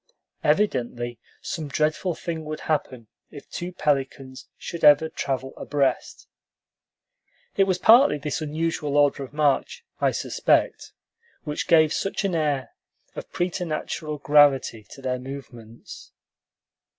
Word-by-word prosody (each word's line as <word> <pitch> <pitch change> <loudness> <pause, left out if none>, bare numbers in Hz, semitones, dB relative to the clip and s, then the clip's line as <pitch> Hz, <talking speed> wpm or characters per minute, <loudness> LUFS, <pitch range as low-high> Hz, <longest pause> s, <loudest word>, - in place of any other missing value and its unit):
Evidently 125 - 0 0.2
some 165 -5 -4
dreadful 155 +4 0
thing 165 -2 -5
would 155 0 -6
happen 130 -6 -2 0.2
if 145 -2 -12
two 175 +1 -6
pelicans 135 -4 -2
should 170 - -7
ever 150 +2 +6
travel 135 -3 -3
abreast. 140 -3 -1 1.3
It 195 - +4
was 185 -2 0
partly 225 - +6
this 145 +2 -4
unusual 155 -1 -2
order 145 -1 +3
of 135 - -7
march, 150 - 0
I - - +3
suspect, - - 0 0.5
which 150 -2 -4
gave 160 -2 +5
such 195 - -2
an 195 - 0
air 150 -5 -1 0.4
of - - -8
preternatural 165 -3 -3
gravity 145 -6 +3
to 135 - -13
their 125 -1 -1
movements. 120 -4 -10
150 Hz, 120 wpm, -24 LUFS, 135-160 Hz, 1.3 s, ever